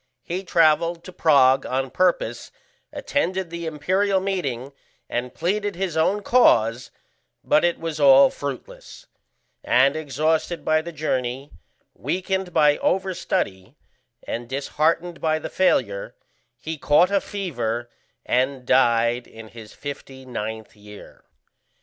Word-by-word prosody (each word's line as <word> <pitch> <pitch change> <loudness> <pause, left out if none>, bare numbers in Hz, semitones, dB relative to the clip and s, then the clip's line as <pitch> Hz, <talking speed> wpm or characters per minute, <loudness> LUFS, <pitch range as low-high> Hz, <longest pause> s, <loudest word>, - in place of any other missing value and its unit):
He 180 +3 -4
travelled 170 -1 +2
to 185 - -11
Prague 135 -6 +4
on 130 0 -2
purpose, 185 +3 0 0.4
attended 190 -10 -2
the 170 -1 -5
imperial 190 +6 0
meeting, 145 -10 -3 0.3
and 125 +1 -3
pleaded 205 +3 -2
his 185 -2 -3
own 195 +6 +1
cause, 120 - +3 0.5
but 155 - +3
it 175 -1 +1
was 160 -2 -5
all 135 -1 +7
fruitless; 140 -3 -8 0.6
and 135 +3 +3
exhausted 155 +3 -1
by 155 0 +2
the 170 +2 -8
journey, 135 -3 -3 0.4
weakened 190 0 -3
by 150 -3 +3
over 190 0 0
study, 95 - -3 0.5
and 120 0 -5
disheartened 160 +5 -1
by 155 -1 +1
the - - -6
failure, 105 - 0 0.4
he 160 +3 -6
caught 170 +7 +4
a 200 -1 +2
fever, 120 - -4 0.4
and 130 0 0
died 120 0 +2
in 110 -1 -12
his 110 0 -12
fifty 135 -2 -9
ninth 110 -2 -6
year. 105 0 -14
150 Hz, 125 wpm, -23 LUFS, 125-175 Hz, 0.6 s, all